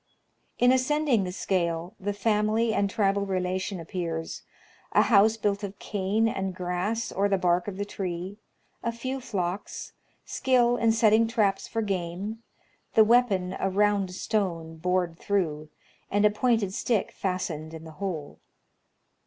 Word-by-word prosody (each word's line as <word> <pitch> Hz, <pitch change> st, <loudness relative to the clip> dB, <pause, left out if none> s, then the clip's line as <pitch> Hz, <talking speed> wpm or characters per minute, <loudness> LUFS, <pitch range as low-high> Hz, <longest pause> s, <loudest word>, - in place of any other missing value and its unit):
In 245 Hz, +1 st, +5 dB
ascending 260 Hz, -4 st, +2 dB
the 180 Hz, -, -3 dB
scale, 175 Hz, -2 st, -1 dB
the 205 Hz, +1 st, -2 dB
family 215 Hz, +2 st, +1 dB
and 200 Hz, -1 st, +1 dB
tribal 200 Hz, 0 st, +1 dB
relation 185 Hz, 0 st, -2 dB
appears, 165 Hz, -1 st, -4 dB, 0.3 s
— -, -, -29 dB
a -, -, +6 dB
house 220 Hz, 0 st, +5 dB
built 205 Hz, -1 st, 0 dB
of 200 Hz, 0 st, -5 dB
cane 205 Hz, +3 st, 0 dB
and 190 Hz, -4 st, -2 dB
grass 185 Hz, +6 st, -2 dB
or 200 Hz, +1 st, +1 dB
the 195 Hz, -, +3 dB
bark 180 Hz, 0 st, +1 dB
of 195 Hz, -2 st, -5 dB
the 205 Hz, -, -2 dB
tree; 185 Hz, 0 st, -5 dB, 0.4 s
a 235 Hz, -, -1 dB
few 255 Hz, +3 st, -4 dB
flocks; 200 Hz, -5 st, -4 dB, 0.3 s
skill 245 Hz, -2 st, +2 dB
in 230 Hz, -2 st, +3 dB
setting 225 Hz, 0 st, +4 dB
traps 210 Hz, -4 st, +1 dB
for 225 Hz, -1 st, -2 dB
game; 195 Hz, +3 st, -3 dB, 0.5 s
the 220 Hz, -, +8 dB
weapon 210 Hz, -6 st, +3 dB
a 195 Hz, -, +1 dB
round 200 Hz, 0 st, +2 dB
stone, 170 Hz, -7 st, -2 dB
bored 180 Hz, 0 st, 0 dB
through, 155 Hz, -7 st, -1 dB, 0.4 s
and 205 Hz, +1 st, +2 dB
a 210 Hz, -, +6 dB
pointed 220 Hz, -3 st, +1 dB
stick 220 Hz, 0 st, 0 dB
fastened 165 Hz, -5 st, -3 dB
in 160 Hz, -1 st, -9 dB
the 160 Hz, -, -10 dB
hole. 170 Hz, -7 st, -4 dB
200 Hz, 150 wpm, -27 LUFS, 180-220 Hz, 0.5 s, the